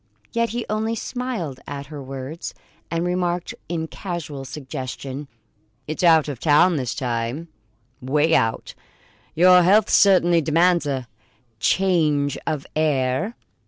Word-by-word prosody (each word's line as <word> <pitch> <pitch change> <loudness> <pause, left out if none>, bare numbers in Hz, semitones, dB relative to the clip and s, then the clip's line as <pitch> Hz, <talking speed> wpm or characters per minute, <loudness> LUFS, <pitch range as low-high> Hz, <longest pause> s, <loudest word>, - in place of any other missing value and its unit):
Yet 230 0 0
he 235 0 -3
only 220 +2 -1
smiled 230 - -4
at 140 0 -6
her 145 0 -8
words 135 +4 -7 0.3
and 165 +1 -1
remarked 180 -1 -1 0.2
in 165 -2 -2
casual 160 -7 -6
suggestion: 135 0 -6 0.6
"It's 155 - -4
out 165 -4 +5
of 140 -5 -5
town 160 +3 +4
this 125 -3 -2
time 125 +5 -3 0.5
'way 150 +5 +1
out. 115 -5 +1 0.6
Your 180 +2 +7
health 200 +4 +4
certainly 175 -4 +5
demands 165 +2 +2
a 130 -3 -3 0.5
change 155 - +2
of 150 -3 -2
air." 155 - 0
160 Hz, 125 wpm, -22 LUFS, 140-180 Hz, 0.6 s, Your